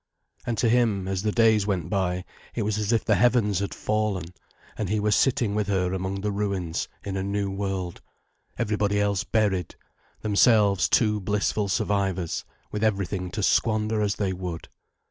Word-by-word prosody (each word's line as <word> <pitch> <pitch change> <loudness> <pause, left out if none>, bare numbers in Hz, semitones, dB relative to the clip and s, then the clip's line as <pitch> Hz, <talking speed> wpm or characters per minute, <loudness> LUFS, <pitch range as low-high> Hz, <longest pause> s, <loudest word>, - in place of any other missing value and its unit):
And 115 -2 -1
to 115 - +2
him, 110 -5 +2
as 95 -1 -1
the 105 +1 0
days 110 -2 +3
went 90 -6 -1
by, 90 -1 -1 0.3
it 115 - 0
was 105 0 -1
as 105 +1 -1
if 115 - +1
the 110 - +3
heavens 105 -2 +3
had 100 - -2
fallen, 105 -5 -2 0.4
and 105 -4 -3
he 105 +1 +1
were 105 +1 +1
sitting 120 -2 +2
with 105 -1 0
her 95 -2 0
among 95 +1 -3
the 105 +1 -1
ruins, 100 -5 -2 0.2
in 100 -1 -4
a 95 - -1
new 100 0 -1
world, 95 -3 -3 0.6
everybody 105 -1 0
else 100 -2 +1
buried, 100 -6 0 0.5
themselves 105 -2 +4
two 105 -2 +3
blissful 105 +1 0
survivors, 95 -3 -1 0.3
with 105 +1 -3
everything 100 -3 0
to 105 +2 -4
squander 110 0 +2
as 105 -1 +1
they 95 -2 -1
would. 90 -3 -6
100 Hz, 170 wpm, -25 LUFS, 95-105 Hz, 0.6 s, themselves